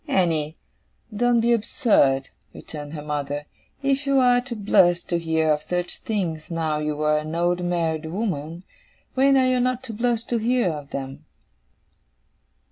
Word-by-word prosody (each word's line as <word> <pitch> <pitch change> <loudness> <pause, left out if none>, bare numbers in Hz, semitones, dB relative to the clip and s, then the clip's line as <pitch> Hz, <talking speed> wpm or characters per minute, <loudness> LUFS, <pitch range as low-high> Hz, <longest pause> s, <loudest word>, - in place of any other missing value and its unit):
'Annie, 160 -4 +1 0.6
don't 240 +1 +3
be 235 +1 +3
absurd,' 205 - +2 0.3
returned 150 -1 -8
her 150 -2 -6
mother. 145 -1 -3 0.4
'If 275 +1 0
you 275 0 +3
are 245 -1 +5
to 245 -1 -6
blush 175 -4 +3
to 170 - -1
hear 160 -1 +1
of 150 0 +1
such 180 +2 -3
things 175 -8 -3
now 160 -3 -1
you 150 0 -2
are 150 0 +3
an 155 +1 -5
old 175 +1 +1
married 165 -2 -1
woman, 170 -3 -3 0.5
when 270 +1 +4
are 260 - +4
you 255 0 +2
not 255 +1 0
to 240 -4 -7
blush 235 +1 0
to 235 -1 -1
hear 235 -4 +1
of 145 -2 -7
them? 135 0 -6
175 Hz, 160 wpm, -23 LUFS, 150-235 Hz, 0.6 s, are